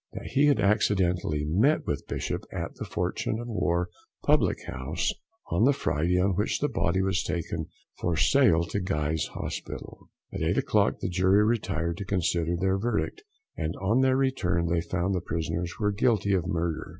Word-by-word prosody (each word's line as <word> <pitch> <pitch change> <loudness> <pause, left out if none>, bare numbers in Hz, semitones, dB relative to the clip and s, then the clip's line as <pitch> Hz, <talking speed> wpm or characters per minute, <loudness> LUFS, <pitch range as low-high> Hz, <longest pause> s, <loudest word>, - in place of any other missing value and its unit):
That - - -7
he 140 +3 +4
had 145 - +3
accidentally 90 -7 +1
met 105 - +2
with 70 - -3
Bishop - - -3
at - - -4
the - - -7
Fortune 110 - -2
of 120 - -6
War 90 -6 0 0.3
public - - +3
house 65 +1 -2 0.4
on - - +2
the 140 - +5
Friday 90 - 0
on 95 +2 +3
which 100 +4 0
the 145 - +1
body 95 +2 0
was 95 -1 +1
taken 85 -2 -3 0.3
for 85 -2 0
sale 85 - +4
to 85 +4 -2
Guy's 75 -5 -1
Hospital. - - -6 0.2
At - - -4
eight - - +1
o'clock - - +2
the - - -1
jury 95 +3 +3
retired 85 -7 -1
to 100 - -5
consider 85 -3 0
their 95 +2 +1
verdict, 120 - -1 0.3
and 80 +2 -3
on 110 +7 +2
their 130 0 +3
return 90 -11 +1
they 85 0 +1
found 90 +3 -1
the 90 - 0
prisoners 85 +1 -3
were 105 -1 +2
Guilty 100 -2 +2
of 90 -3 +1
Murder. 85 -3 -2
90 Hz, 175 wpm, -27 LUFS, 85-105 Hz, 0.4 s, the